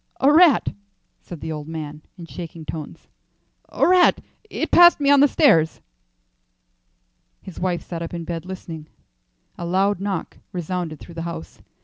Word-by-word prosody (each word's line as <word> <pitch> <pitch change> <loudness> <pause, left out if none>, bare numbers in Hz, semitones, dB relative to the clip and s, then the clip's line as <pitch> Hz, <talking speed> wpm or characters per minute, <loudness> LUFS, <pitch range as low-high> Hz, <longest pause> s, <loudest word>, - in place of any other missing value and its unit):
"A 280 +2 +4
rat," 330 -2 +5 0.5
said 170 -4 -10
the 160 - -5
old 150 -1 -6
man 155 -2 -7 0.2
in 170 - -9
shaking 165 -1 -9
tones 155 -2 -8 0.6
"a - - +1
rat. 360 0 +5 0.3
It - - -4
passed 345 -1 +7
me 285 -1 +3
on 285 - +6
the 285 - +6
stairs." 170 - +3 1.6
His 185 - -10
wife 180 -2 -1
sat 170 -2 -6
up 165 - -5
in 170 -1 -5
bed 165 0 -5
listening. 170 -4 -8 0.7
A - - -5
loud 195 +2 +1
knock 195 -3 -4
resounded 175 -3 -4
through 170 - -12
the 165 - -6
house. 80 - -9
175 Hz, 155 wpm, -22 LUFS, 160-200 Hz, 1.6 s, passed